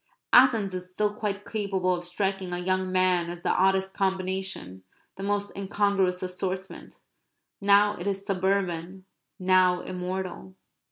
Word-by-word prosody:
Athens 230 Hz, -6 st, +6 dB
is 180 Hz, 0 st, -6 dB
still 210 Hz, +2 st, 0 dB
quite 205 Hz, -1 st, -3 dB
capable 195 Hz, -4 st, -1 dB
of 175 Hz, -1 st, -3 dB
striking 190 Hz, 0 st, -2 dB
a -, -, -1 dB
young 185 Hz, +1 st, -1 dB
man 185 Hz, -2 st, +2 dB
as 175 Hz, 0 st, -8 dB
the -, -, +2 dB
oddest 190 Hz, 0 st, +2 dB
combination, 190 Hz, -, -2 dB, 0.3 s
the -, -, -9 dB
most 205 Hz, 0 st, -2 dB
incongruous 195 Hz, -2 st, 0 dB
assortment. 185 Hz, +1 st, -5 dB, 0.7 s
Now 205 Hz, +1 st, +5 dB
it 175 Hz, 0 st, -6 dB
is 195 Hz, 0 st, -2 dB
suburban; 190 Hz, -2 st, -1 dB, 0.3 s
now 185 Hz, -1 st, +3 dB
immortal. 185 Hz, 0 st, -5 dB
190 Hz, 130 wpm, -27 LUFS, 180-200 Hz, 0.7 s, Athens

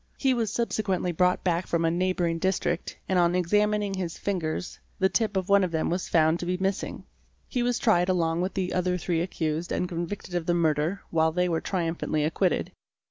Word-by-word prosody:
He 270 Hz, -2 st, +2 dB
was 230 Hz, -3 st, 0 dB
subsequently 210 Hz, -6 st, -1 dB
brought 180 Hz, +2 st, +2 dB
back 175 Hz, -1 st, 0 dB
from 170 Hz, -1 st, +1 dB
a 165 Hz, -, +2 dB
neighbouring 175 Hz, -1 st, 0 dB
district 180 Hz, -1 st, -1 dB
and 185 Hz, -1 st, +2 dB
on 175 Hz, 0 st, +3 dB
ex 180 Hz, -2 st, -1 dB
amining 210 Hz, -1 st, +2 dB
his 175 Hz, -3 st, -3 dB
fingers 180 Hz, -3 st, -3 dB, 0.2 s
the 190 Hz, 0 st, +3 dB
tip 205 Hz, 0 st, 0 dB
of 185 Hz, -1 st, -1 dB
one 200 Hz, -1 st, +5 dB
of 185 Hz, -, 0 dB
them 160 Hz, -1 st, -1 dB
was 180 Hz, +1 st, -2 dB
found 160 Hz, 0 st, +3 dB
to -, -, -4 dB
be 180 Hz, 0 st, 0 dB
missing. 190 Hz, +1 st, -2 dB, 0.4 s
He 250 Hz, -, -1 dB
was 245 Hz, 0 st, +1 dB
tried 180 Hz, -5 st, +3 dB
along 170 Hz, -2 st, +1 dB
with 185 Hz, +2 st, -2 dB
the 185 Hz, -2 st, -1 dB
other 180 Hz, 0 st, +1 dB
three 170 Hz, -1 st, -1 dB
accused 165 Hz, -1 st, -2 dB
and 180 Hz, -, 0 dB
convicted 175 Hz, +2 st, -5 dB
of 175 Hz, -2 st, -2 dB
the 175 Hz, -, +2 dB
murder, 160 Hz, +3 st, +1 dB
while 160 Hz, -1 st, +3 dB
they 180 Hz, +2 st, +1 dB
were 165 Hz, -2 st, 0 dB
triumphantly 165 Hz, -4 st, -1 dB
acquitted. 170 Hz, +4 st, 0 dB
180 Hz, 205 wpm, -27 LUFS, 165-190 Hz, 0.4 s, one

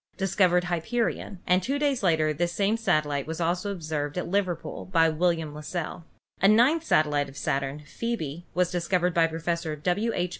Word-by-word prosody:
discovered 185 Hz, -2 st, +3 dB
Hyperion, 180 Hz, +2 st, -2 dB
and 180 Hz, +1 st, +3 dB
two 275 Hz, +9 st, -1 dB
days 285 Hz, -3 st, +1 dB
later 160 Hz, -5 st, +2 dB
this 175 Hz, +3 st, -1 dB
same 200 Hz, +4 st, +1 dB
satellite 150 Hz, -10 st, 0 dB
was 160 Hz, +1 st, -4 dB
also 175 Hz, +4 st, 0 dB
observed 155 Hz, -5 st, -3 dB
at 180 Hz, -, -2 dB
Liverpool 185 Hz, -3 st, -2 dB
by 165 Hz, -3 st, +3 dB
William 165 Hz, -1 st, 0 dB
Las 150 Hz, 0 st, -8 dB
sell. 170 Hz, -1 st, -4 dB, 0.4 s
A 195 Hz, -, +6 dB
ninth 250 Hz, +10 st, +5 dB
satellite 150 Hz, -, +2 dB
of 135 Hz, -, -13 dB
Saturn, 140 Hz, +2 st, -2 dB
Phcebe, 175 Hz, -5 st, -4 dB
was 180 Hz, -1 st, +2 dB
discovered 180 Hz, 0 st, 0 dB
by 165 Hz, -1 st, +4 dB
Professor 165 Hz, 0 st, -2 dB
W. 180 Hz, +9 st, 0 dB
H. 180 Hz, 0 st, 0 dB
175 Hz, 175 wpm, -27 LUFS, 155-195 Hz, 0.4 s, A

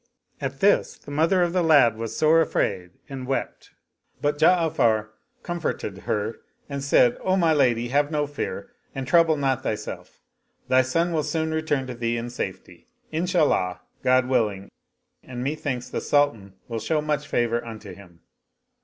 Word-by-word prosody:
At 135 Hz, 0 st, -4 dB
this 205 Hz, +1 st, +3 dB
the -, -, -12 dB
mother 165 Hz, +5 st, +3 dB
of 175 Hz, 0 st, -1 dB
the 185 Hz, -, +2 dB
lad 145 Hz, -9 st, +5 dB
was 115 Hz, 0 st, -5 dB
sore 160 Hz, +1 st, +5 dB
afraid 95 Hz, -, -1 dB, 0.2 s
and 130 Hz, -2 st, -7 dB
wept; 135 Hz, -, -3 dB, 0.5 s
but 145 Hz, 0 st, -1 dB
Ja'afar 155 Hz, -11 st, +3 dB, 0.3 s
comforted 170 Hz, -, -3 dB
her 105 Hz, +2 st, -1 dB, 0.3 s
and 140 Hz, -1 st, -5 dB
said, 125 Hz, -3 st, +4 dB
" -, -, -18 dB
O 185 Hz, 0 st, +1 dB
my 165 Hz, -3 st, +3 dB
lady, 120 Hz, -5 st, +2 dB
have 145 Hz, +2 st, +2 dB
no 150 Hz, -2 st, 0 dB
fear 145 Hz, +11 st, -5 dB, 0.2 s
and 135 Hz, -1 st, -3 dB
trouble 165 Hz, -1 st, +4 dB
not 135 Hz, -2 st, 0 dB
thyself. 105 Hz, -3 st, -5 dB, 0.5 s
Thy 130 Hz, 0 st, +5 dB
son 165 Hz, +7 st, 0 dB
will 155 Hz, -, +1 dB
soon 160 Hz, +1 st, -2 dB
return 155 Hz, -4 st, -1 dB
to 125 Hz, -, -6 dB
thee 120 Hz, 0 st, -2 dB
in 120 Hz, +1 st, -5 dB
safety, 125 Hz, -, -7 dB, 0.2 s
Inshallah 160 Hz, -, +1 dB
— -, -, -43 dB
God 130 Hz, 0 st, +4 dB
willing 105 Hz, -7 st, 0 dB, 0.3 s
— -, -, -52 dB
^and 125 Hz, -1 st, -5 dB
methinks 135 Hz, -3 st, -3 dB
the -, -, -2 dB
Sultan 115 Hz, -10 st, +1 dB
will 115 Hz, -2 st, -3 dB
show 155 Hz, +6 st, 0 dB
much 150 Hz, -1 st, -2 dB
favor 120 Hz, -2 st, 0 dB
unto 110 Hz, -4 st, -9 dB
him." 90 Hz, -3 st, -16 dB
135 Hz, 170 wpm, -24 LUFS, 115-155 Hz, 0.5 s, lad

